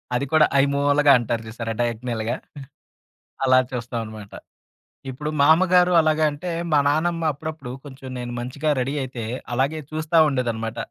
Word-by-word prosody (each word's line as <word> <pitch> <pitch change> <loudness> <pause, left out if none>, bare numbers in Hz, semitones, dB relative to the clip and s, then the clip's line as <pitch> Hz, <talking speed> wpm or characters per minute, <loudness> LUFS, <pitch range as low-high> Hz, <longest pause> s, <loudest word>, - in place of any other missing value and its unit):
అది 130 +3 0
కూడా 155 -1 +6 0.2
ఐమూలగా 140 +1 +3
అంటారు 115 -1 -2
జూసారా 115 0 -5
డయాగ్నల్‌గా, 120 0 -2 1.1
అలా 130 0 +5
చూస్తామన్నమాట. 115 -4 -6 0.8
ఇప్పుడు 150 +4 -5
మామ్మగారు 180 +4 +5
అలాగా 155 0 +2
అంటే 170 +5 -6 0.2
మా 145 - +5
నానమ్మ 165 +3 0
అప్పుడప్పుడు 155 -3 -7
కొంచెం 130 -1 -10
నెను 120 0 -5
మంచిగా 140 +5 -3
రడీ 135 +3 -2
అయితే 125 -3 -6 0.3
అలాగే 140 +5 0
చూస్తా 155 +1 -1
ఉండేదన్నమాట. 115 -4 -2
135 Hz, 125 wpm, -23 LUFS, 120-155 Hz, 1.1 s, కూడా